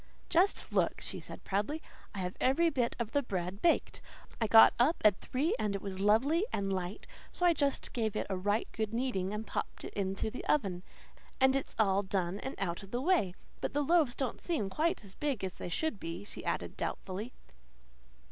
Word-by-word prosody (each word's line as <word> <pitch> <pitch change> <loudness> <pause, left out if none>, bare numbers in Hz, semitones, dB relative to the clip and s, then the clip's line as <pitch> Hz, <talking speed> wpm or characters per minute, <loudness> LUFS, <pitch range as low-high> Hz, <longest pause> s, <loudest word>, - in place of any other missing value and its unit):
"Just 360 +4 +2
look," - - +2
she - - -5
said - - -10
proudly. 205 +11 -1 0.4
"I 195 - -3
have 180 0 -3
every 330 +6 +3
bit 245 -5 0
of 230 -2 -3
the 285 - +2
bread 190 -4 -4
baked. 340 - +2 0.4
I 225 - +3
got 225 +1 +9
up 285 +8 +4
at 205 -2 +6
three, 295 +9 0
and 205 -2 0
it 200 - -3
was 190 -2 -5
lovely 245 - +3
and 195 -1 -1
light, 185 +1 -4 0.3
so 355 - -1
I 345 - +6
just 285 -3 -1
gave 220 -3 -1
it - - -1
a 195 - -2
right 205 +4 0
good 220 0 -2
kneading 230 -7 -1
and 210 +1 -4
popped - - -4
it - - -7
into 195 +2 -2
the 250 - -6
oven. 195 -11 +1 0.6
And 265 0 +5
it's 275 - -2
all 200 -2 +3
done 190 -1 -1
and 265 - -5
out 175 -3 -2
of 195 - -11
the 240 - -2
way. 265 - +2 0.2
But - - -3
the 290 - +2
loaves 310 -5 +3
don't 265 -4 -3
seem 225 - -1
quite 320 - 0
as 195 -2 -12
big 285 -8 -2
as 185 -2 -2
they - - -6
should 270 - -1
be," 165 +2 -5
she - - -7
added - - -2
doubtfully. 200 +6 -4
220 Hz, 205 wpm, -32 LUFS, 195-275 Hz, 0.6 s, got